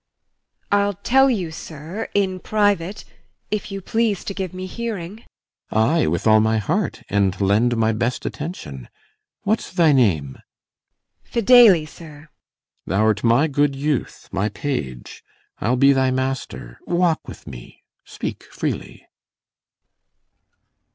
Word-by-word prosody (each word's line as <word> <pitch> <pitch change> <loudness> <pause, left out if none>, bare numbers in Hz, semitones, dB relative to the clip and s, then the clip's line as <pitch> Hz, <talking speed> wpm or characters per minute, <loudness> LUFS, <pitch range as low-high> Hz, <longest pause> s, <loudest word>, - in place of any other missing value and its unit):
IMOGEN. 205 0 +4
I'll 200 0 0
tell 270 +2 +5
you, 185 -10 -1
sir, 160 +6 -7
in 190 -2 +1
private, 205 -2 0 0.5
if 210 0 -3
you 195 0 -5
please 220 -1 0
To 195 - -4
give 190 -3 -4
me 185 0 -6
hearing. 215 0 -6 0.5
CYMBELINE. 110 +10 +2
Ay, - - +2
with 85 +2 -1
all 110 -1 +6
my 110 0 +2
heart, 160 - -1
And 100 -2 +1
lend 110 +5 +2
my 110 0 +2
best 115 +3 -2
attention. 75 - -6 0.5
What's 215 +3 -1
thy 170 -4 +4
name? 85 - +2
IMOGEN. - - -23 0.8
Fidele, 230 -8 +6
sir. 165 +2 -13
CYMBELINE. 150 0 -14 0.6
Thou'rt 105 +2 +1
my 120 +7 +4
good 145 -1 +1
youth, 145 -1 -2
my 100 +2 0
page; 85 - -5 0.4
I'll 120 +5 +1
be 140 +2 +6
thy 130 -1 +2
master. 130 - -3
Walk 175 -2 +1
with - - -10
me; - - -11 0.2
speak - - -6
freely. - - -5
150 Hz, 135 wpm, -21 LUFS, -, 0.8 s, all